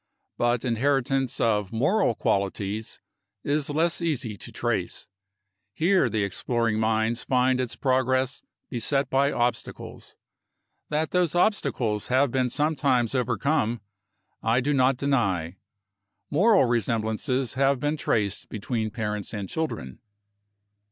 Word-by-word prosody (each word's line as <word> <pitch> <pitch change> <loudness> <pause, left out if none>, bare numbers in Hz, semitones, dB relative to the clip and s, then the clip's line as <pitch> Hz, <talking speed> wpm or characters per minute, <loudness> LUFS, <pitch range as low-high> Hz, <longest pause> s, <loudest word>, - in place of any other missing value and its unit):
But 120 +1 0
inheritance 135 +1 0
of 105 -4 +1
moral 145 - +2
qualities 100 +2 -2 0.4
is 145 0 0
less 165 +4 0
easy 135 -10 -1
to - - -10
trace. - - -2 0.7
Here, 185 +4 +3
the 110 -2 0
exploring 110 +3 -1
mind 110 +1 +1
finds 130 0 +2
its 125 -2 -4
progress 130 0 +1 0.3
beset 135 +4 -1
by 140 +2 +3
obstacles. 120 -2 -3 0.7
That 155 +1 -1
those 180 -3 +1
obstacles 140 - +1
have 130 +1 +2
been 130 -1 +1
sometimes 140 -5 +1
overcome 125 -1 0 0.6
I 115 +2 +2
do 145 +4 0
not 130 -1 +3
deny. 95 - 0 0.7
Moral 195 - +5
resemblances 120 +2 -1
have 135 0 +2
been 145 +3 0
traced 105 -9 -1
between 110 +1 -3
parents 105 -2 -4
and 100 -2 -4
children. 120 - -4
125 Hz, 115 wpm, -26 LUFS, 110-140 Hz, 0.7 s, Moral